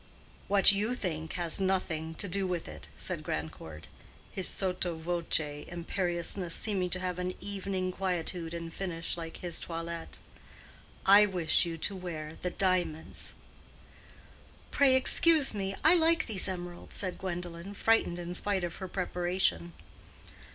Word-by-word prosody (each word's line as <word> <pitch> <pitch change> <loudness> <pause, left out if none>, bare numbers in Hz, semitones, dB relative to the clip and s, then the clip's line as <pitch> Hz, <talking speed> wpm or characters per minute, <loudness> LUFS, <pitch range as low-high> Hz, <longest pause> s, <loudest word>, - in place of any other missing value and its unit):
"What 200 0 +7
you 210 +5 0
think 160 -8 -3
has 175 -1 0
nothing 165 -4 -1
to 200 - -3
do 195 +1 +1
with 180 -2 -2
it," 75 -1 -10
said - - -3
Grandcourt, 80 0 -5 0.5
his 190 - -1
sotto 180 -2 0
voce 160 -3 -1
imperiousness 175 0 -1
seeming 190 -4 0
to 185 - -1
have 180 -1 -3
an 180 0 -2
evening 195 -2 -3
quietude 180 -3 -2
and 165 -1 -6
finish, 175 -3 -3
like 165 -1 -7
his 175 -2 -2
toilet. 165 0 -5 0.9
"I 205 +2 +8
wish 175 -4 +3
you 165 -1 -4
to 195 +5 -1
wear 160 -4 -6
the 180 - -1
diamonds." 180 -4 -1 1.4
"Pray 275 -2 +5
excuse 300 +2 +5
me; 195 -1 -2
I 315 - +7
like 330 -1 +4
these 205 -5 -2
emeralds," 175 -2 -6
said 185 -3 -2
Gwendolen, 175 +1 -5
frightened 225 -5 +2
in 175 0 -5
spite 195 0 0
of 170 -1 -3
her 190 - -5
preparation. 175 - 0
180 Hz, 140 wpm, -31 LUFS, 165-195 Hz, 1.4 s, I